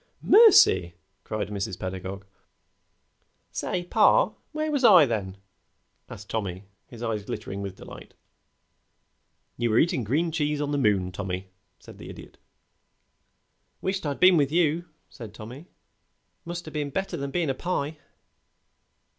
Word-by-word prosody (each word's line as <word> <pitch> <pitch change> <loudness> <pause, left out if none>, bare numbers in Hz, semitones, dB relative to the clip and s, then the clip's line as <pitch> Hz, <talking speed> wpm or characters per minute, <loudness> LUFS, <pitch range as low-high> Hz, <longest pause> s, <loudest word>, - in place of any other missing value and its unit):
"Mercy!" 95 - +6 0.3
cried 110 -1 -4
Mrs. 100 -2 -4
Pedagog. 95 +1 -6 1.3
"Say, 180 - -3
pa, - - +3 0.2
where 310 0 -2
was 285 -3 -1
I 180 -10 +8
then?" 100 -6 -3 0.7
asked 105 0 -10
Tommy, 100 -4 -4 0.2
his 120 -1 -10
eyes 110 -3 -2
glittering 100 0 -6
with 100 -1 -6
delight. - - -12 1.4
"You 120 0 0
were 110 - +2
eating 165 -4 +2
green 155 +10 0
cheese 150 -2 -1
on 145 0 -2
the 145 - 0
moon, 100 -7 +1
Tommy," 95 0 -5 0.3
said - - -15
the - - -10
Idiot. - - -12 1.4
"Wisht 190 0 -2
I'd 140 - -3
been 185 -1 +6
with 140 -2 +2
you," 170 0 +1 0.2
said 110 -5 -11
Tommy. 125 +10 -10 0.8
"Must 175 -1 -6
o' - - -7
been 150 -2 -3
better 195 +7 -3
than 140 0 -4
bein' 160 0 -1
a - - -1
pie." 155 -1 -3
135 Hz, 140 wpm, -26 LUFS, 100-170 Hz, 1.4 s, I